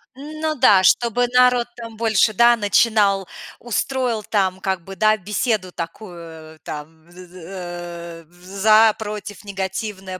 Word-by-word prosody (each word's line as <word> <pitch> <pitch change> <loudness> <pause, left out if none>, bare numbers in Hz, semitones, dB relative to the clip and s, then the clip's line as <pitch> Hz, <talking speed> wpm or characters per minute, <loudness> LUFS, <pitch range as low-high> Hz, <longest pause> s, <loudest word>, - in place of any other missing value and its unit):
Ну 310 +3 -4
да, 210 -8 +5
чтобы 240 +4 +3
народ 250 -1 +3
там 230 -2 -9
больше, 220 -1 +2
да, 235 +3 +5
начинал, 205 -2 +2 0.3
устроил 240 -1 -2
там 190 -3 -1
как 190 -3 -2
бы, 195 +2 -10
да, 215 +1 +3
беседу 210 -1 -2
такую, 165 -3 -9
э, - - -26
там: 160 +2 -9
з 180 0 -13
з 175 - -22
э, 175 -2 -8
в 175 +2 -24
за, 215 +4 +4
против, 210 -1 -7
негативное, 190 -1 -5
200 Hz, 140 wpm, -20 LUFS, 180-225 Hz, 0.3 s, да